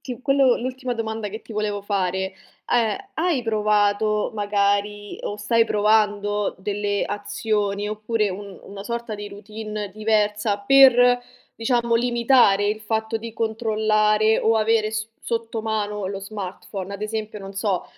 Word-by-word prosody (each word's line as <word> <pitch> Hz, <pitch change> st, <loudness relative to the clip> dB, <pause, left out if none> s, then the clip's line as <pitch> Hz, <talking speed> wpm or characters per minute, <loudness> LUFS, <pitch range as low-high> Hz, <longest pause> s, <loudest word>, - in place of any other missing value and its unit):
ti 250 Hz, -2 st, -7 dB
quello 275 Hz, -3 st, +4 dB
l'ultima 255 Hz, 0 st, -4 dB
domanda 220 Hz, -2 st, -3 dB
che 220 Hz, +3 st, -8 dB
ti -, -, -11 dB
volevo 210 Hz, -1 st, -2 dB
fare 190 Hz, -1 st, -1 dB, 0.3 s
a 240 Hz, -, +3 dB
è: 395 Hz, 0 st, -11 dB
hai 320 Hz, -6 st, 0 dB
provato 210 Hz, -1 st, +1 dB
magari, 205 Hz, 0 st, 0 dB
o 205 Hz, -, -4 dB
stai 230 Hz, +2 st, +2 dB
provando 210 Hz, -1 st, +1 dB
delle 205 Hz, +1 st, -1 dB
azioni 205 Hz, 0 st, -2 dB
oppure 215 Hz, -1 st, -1 dB
un 200 Hz, 0 st, -8 dB
una 200 Hz, 0 st, -9 dB
sorta 235 Hz, -1 st, -4 dB
di 205 Hz, 0 st, -6 dB
routine 210 Hz, 0 st, -6 dB
diversa 210 Hz, -1 st, +1 dB
per 245 Hz, +1 st, +6 dB, 0.3 s
diciamo 235 Hz, 0 st, +1 dB
limitare 235 Hz, -4 st, +4 dB
il 215 Hz, +1 st, -1 dB
fatto 220 Hz, +1 st, -1 dB
di 230 Hz, 0 st, -7 dB
controllare 215 Hz, -1 st, +2 dB
o 225 Hz, 0 st, +2 dB
avere 220 Hz, 0 st, +2 dB
s 220 Hz, 0 st, -3 dB, 0.2 s
sotto 230 Hz, -1 st, -2 dB
mano 210 Hz, -2 st, -2 dB
lo 195 Hz, 0 st, -4 dB
smartphone? 195 Hz, -1 st, -6 dB
Ad 200 Hz, -, -7 dB
esempio 215 Hz, 0 st, -4 dB
non 195 Hz, -1 st, -9 dB
so, 195 Hz, -2 st, -1 dB
215 Hz, 145 wpm, -23 LUFS, 205-225 Hz, 0.3 s, per